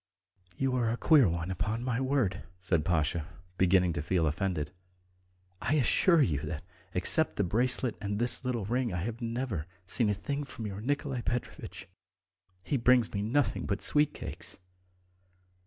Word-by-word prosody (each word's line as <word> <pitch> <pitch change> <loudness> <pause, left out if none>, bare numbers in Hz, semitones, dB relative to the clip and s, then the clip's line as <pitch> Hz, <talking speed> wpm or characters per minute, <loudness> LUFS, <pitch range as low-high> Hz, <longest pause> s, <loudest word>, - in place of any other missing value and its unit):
"You 135 -1 +1
are 120 -2 +1
a 115 - -1
queer 145 - +5
one, 85 +2 -2
upon 105 +6 -2
my 125 -1 0
word," 130 -9 +1 0.2
said 90 -4 0
Pasha, 80 -1 0 0.3
beginning 90 -1 +4
to 85 - -2
feel 85 +2 +1
offended. 80 -1 -1 0.9
"I 120 +8 +1
assure 155 - +4
you 75 - +1
that, 75 +1 -5 0.3
except 155 - +3
the 100 - +1
bracelet 120 +5 +1
and 100 0 -2
this 120 +3 0
little 120 -5 -1
ring, 120 +2 0
I've 110 +7 -3
never 115 - -3 0.2
seen 110 +4 0
a 105 - +1
thing 140 +9 -3
from 130 -5 -7
your 100 0 -5
Nikolay 140 0 -1
Petrovitch. 120 +1 -4 0.8
He 140 - 0
brings 125 -1 +4
me 100 - -1
nothing 130 +7 0
but 100 0 -2
sweet 150 0 +3
cakes." - - -5
110 Hz, 155 wpm, -30 LUFS, 90-125 Hz, 0.9 s, queer